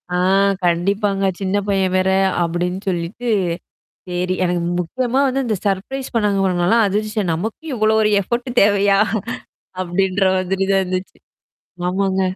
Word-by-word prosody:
ஆ - - +2 0.5
கண்டிப்பாங்க. 195 +3 +1 0.2
சின்ன 195 0 -1
பையன் 190 -2 +1
வேற 185 0 +2 0.3
அப்டின்னு 175 +3 -2
சொல்லிட்டு. 180 +8 -3 0.8
சரி. 180 +1 -1
எனக்கு 175 -1 0 0.2
முக்கியமா 250 +9 -1
வந்து 270 +1 0
இந்த 215 -3 0
சர்ப்ரைஸ் 230 +8 -2
பண்ணாங்க 200 -4 +2
நாலாம் 225 +5 +4
அதிர்ச்ச 215 +1 -1
நமக்கும் 220 - -4
இவ்ளோ 215 -1 +2
ஒரு 210 0 +2
எஃபோர்ட் 240 +6 -3
தேவையா? 200 -1 +3 0.8
அப்டின்ற 190 +2 0
மாதிரி 190 +1 -1
தான் 195 0 +3
இருந்துச்சு. 185 0 -4 0.7
ஆமாங்க. 190 0 0
195 Hz, 125 wpm, -19 LUFS, 185-215 Hz, 0.8 s, நாலாம்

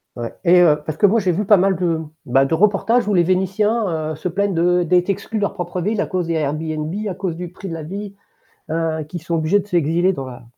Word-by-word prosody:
Ouais. 120 -1 -5
Et 180 +1 +6
heu 155 -4 +4
parce 155 -1 -4
que 205 - +6
moi 225 +4 +3
j'ai 185 -3 +1
vu 185 +5 -1
pas 205 0 +5
mal 190 +1 +2
de 170 -2 0 0.3
bah 135 +2 +3
de 165 - -2
reportages 210 +6 +2
où 205 - +1
les 175 - +4
Vénitiens, 185 -2 0
heu, - - -4
se 160 +4 -4
plaignent 200 +2 0
de 175 +1 +2
d'être 180 +3 +2
exclus 200 +3 -2
de - - -4
leur 200 - 0
propre 175 -1 -4
ville 210 +3 -1
à - - 0
cause 180 -3 -2
des 170 - -1
Airbnb, 155 +1 -2 0.2
à 180 - -4
cause 185 -3 -3
du 175 0 -6
prix 195 +1 -9
de 170 - -5
la 165 - -5
vie, 200 +5 -6 0.6
heu, 160 -1 -1
qu'ils 175 +1 -7
sont 170 +1 -2
obligés 165 +6 +2
de 200 - -7
s'exiler 175 +1 +2
dans 135 -8 -5
la 125 -2 -10
175 Hz, 260 wpm, -20 LUFS, 160-195 Hz, 0.6 s, Et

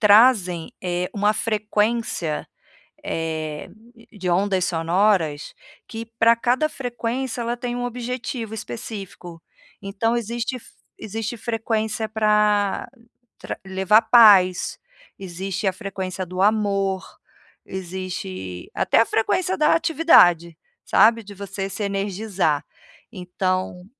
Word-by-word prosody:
trazem, 205 -6 +4
eh, 180 0 -2
uma 205 0 +2
frequência, 215 -5 -1 0.6
eh 155 -2 -4 0.4
de 190 -4 -4
ondas 190 0 +1
sonoras, 165 -2 +1 0.3
que, 225 0 -7
para 230 +1 +6
cada 250 +6 +1
frequência, 245 -1 -4
ela 235 +1 -2
tem 240 0 -4
um 245 - -3
objetivo 245 -2 -4
específico. 180 - -8 0.4
Então, 210 +4 -1
existe 235 +2 -3
f 245 - -14 0.3
existe 225 +2 -5
frequência 220 -1 -2
para 210 -2 +1 0.5
tra - - -6
levar 190 +4 +3
paz, 205 -6 +5 0.4
existe 190 +1 -4
a 190 - +2
frequência 190 0 -5
do 185 +1 -6
amor, 195 -2 +1 0.6
existe 175 - -6
até - - +3
a 230 - +4
frequência 365 +11 0
da 305 -1 +4
atividade, 240 - +4 0.3
sabe, 230 +1 +4
de 205 0 -11
você 195 0 -5
se 200 +2 -5
energizar. 195 -5 -1 0.5
Então, 185 -2 -3
205 Hz, 110 wpm, -22 LUFS, 185-230 Hz, 0.6 s, para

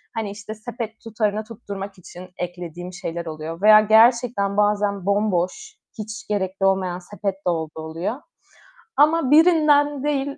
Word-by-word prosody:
Hani 220 -3 -3
işte 210 +1 -8
sepet 225 0 -7
tutarını 215 -1 -1
tutturmak 200 -3 -8
için 180 +1 -12
eklediğim 175 0 -6
şeyler 170 -2 -5
oluyor 160 +1 -6
veya 215 +1 +8
gerçekten 220 -2 +3
bazen 205 -2 +1
bomboş, 200 - -1 0.2
hiç 215 +1 -7
gerekli 195 -2 -1
olmayan 190 -2 +1
sepet 195 +1 -4
de - - +4
olduğu 160 -2 -3
oluyor. 165 +7 -4 0.8
Ama 300 -2 +3
birinden 295 -3 +4
değil 280 -1 -1
205 Hz, 135 wpm, -22 LUFS, 185-230 Hz, 0.8 s, veya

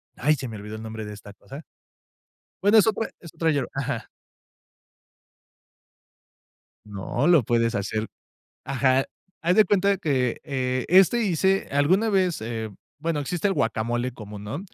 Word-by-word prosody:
¡ay!, 150 +5 +2
se 130 -1 -6
me 110 -2 -7
olvidó 105 +1 -8
el 110 - -8
nombre 110 -1 -6
de 105 - -7
esta 105 0 -12
cosa 140 +8 -11 1.0
bueno, 205 +2 +6
es 215 - +6
otra 220 +1 0
es 165 - -12
otra 165 -1 +1
yerb 140 -4 -1
Ajá. 135 -3 -3 2.8
No, 105 +6 -3
lo 170 -4 +6
puedes 115 +1 +1
hacer 110 0 -2 0.6
Ajá, 135 0 +2 0.4
haz 175 +3 +2
de 215 - +7
cuenta 200 -1 +2
que, 130 -8 0
eh, 130 -3 -1
este 190 +7 +5
hice 190 -1 +1
alguna 175 +11 +2
vez, 185 -5 +1
eh, 110 -1 -4 0.3
bueno, 160 0 -2
existe 175 +7 -1
guacamole 120 - -1
común, 105 -3 -9
¿no?, 130 +9 -4
135 Hz, 145 wpm, -25 LUFS, 115-175 Hz, 2.8 s, de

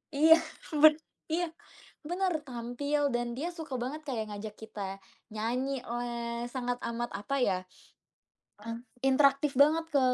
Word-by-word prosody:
iya, 320 +3 +8 0.4
ben 305 +1 +8 0.4
iya, 345 +2 +1 0.6
bener. 355 -3 0
Tampil 265 +4 -1
dan 240 0 -1
dia 315 - -2
suka 315 -5 -5
banget 290 +6 -4
kayak 225 -5 -2
ngajak 210 +1 -6
kita 200 -3 -6 0.3
nyanyilah, 235 0 -2
sangat 245 -2 -1
amat, 235 +1 -2
apa 205 +8 -2
ya, 190 -4 +2
m - - -30 1.5
interaktif 275 0 +4
banget 315 +3 +5
ke 280 - +6
255 Hz, 125 wpm, -30 LUFS, 235-295 Hz, 1.5 s, iya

